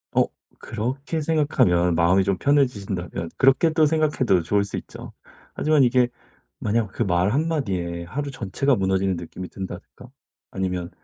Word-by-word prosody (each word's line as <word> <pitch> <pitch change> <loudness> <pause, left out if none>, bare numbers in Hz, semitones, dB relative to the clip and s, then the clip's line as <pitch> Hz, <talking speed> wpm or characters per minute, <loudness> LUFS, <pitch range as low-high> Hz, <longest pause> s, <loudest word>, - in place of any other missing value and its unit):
어. - - +5 0.4
그렇게 135 +8 -3
생각하면 120 - +2
마음이 85 +4 +3
좀 95 -1 0
편해지신다면 100 - 0
그렇게 135 +5 +4
또 160 -2 +4
생각해도 145 - +2
좋을 100 +5 +1
수 100 - -5
있죠. - - -9 0.4
하지만 155 -2 +3
이게 125 0 +3 0.5
만약 110 0 0
그 120 - -1
말 90 +1 +1
한마디에 100 - -1
하루 140 +9 -4
전체가 130 +5 0
무너지는 95 -1 0
느낌이 90 +2 -8
든다든가 95 -1 -9 0.4
아니면 90 -2 -3
100 Hz, 345 characters per minute, -23 LUFS, 90-140 Hz, 0.5 s, 어